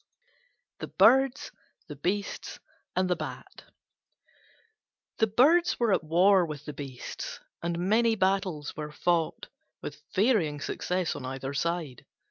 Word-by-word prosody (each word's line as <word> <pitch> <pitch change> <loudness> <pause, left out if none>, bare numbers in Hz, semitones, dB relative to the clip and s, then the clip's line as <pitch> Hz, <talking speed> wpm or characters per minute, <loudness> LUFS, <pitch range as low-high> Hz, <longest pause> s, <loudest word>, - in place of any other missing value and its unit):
THE - - -5
BIRDS, 265 0 +4 0.3
THE 150 - -8
BEASTS, 190 +8 -3 0.4
AND 185 0 +2
THE 180 - +1
BAT 155 -2 -8 1.5
The 220 - +4
Birds 315 - +4
were 235 -4 +3
at 185 - +1
war 180 +4 +4
with 150 -3 -6
the 150 - -6
Beasts, 135 -4 -7 0.2
and 170 0 -2
many 225 +2 +3
battles 190 -6 0
were 150 -1 -5
fought 165 +1 -1 0.3
with - - -7
varying 190 - +2
success 180 +4 -2
on - - -7
either 135 +1 -5
side. 160 -3 -3
175 Hz, 125 wpm, -28 LUFS, 150-205 Hz, 1.5 s, BIRDS